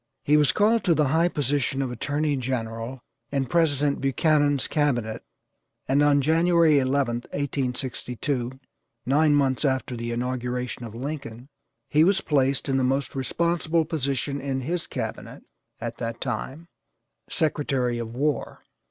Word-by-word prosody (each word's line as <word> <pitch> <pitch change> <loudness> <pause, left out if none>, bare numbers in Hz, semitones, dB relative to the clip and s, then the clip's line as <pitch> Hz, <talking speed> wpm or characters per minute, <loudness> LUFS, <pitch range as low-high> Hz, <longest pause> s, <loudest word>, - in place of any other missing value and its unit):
He 150 - +3
was 150 -3 +5
called 220 +2 +3
to 170 -4 +4
the 150 -3 +2
high 165 +4 +3
position 145 -4 0
of 130 -2 -1
attorney 145 +4 -1
general 120 -1 -4 0.3
in 135 -2 0
President 145 -1 +1
Buchanan's 145 +1 +2
cabinet, 120 -8 0 0.6
and 140 +2 +3
on 145 -1 +4
January 165 0 +4
11th, 130 -3 0
1862, 130 -1 -2 0.5
nine 145 +3 +4
months 135 -2 +1
after 130 -3 0
the 115 0 -4
inauguration 125 0 -3
of 115 -1 -9
Lincoln, 130 -2 -6 0.4
he 150 +1 +4
was 190 +2 +3
placed 135 -5 +1
in 135 -1 +1
the 130 - +1
most 135 +1 0
responsible 165 +4 0
position 140 -3 -2
in 135 -1 -2
his 170 +6 -3
cabinet - - -6 0.4
at 115 0 -5
that 115 -1 -4
time, 135 +6 -4 0.6
Secretary 135 -6 0
of 115 0 -6
War. 145 +3 -2
135 Hz, 135 wpm, -25 LUFS, 125-150 Hz, 0.6 s, was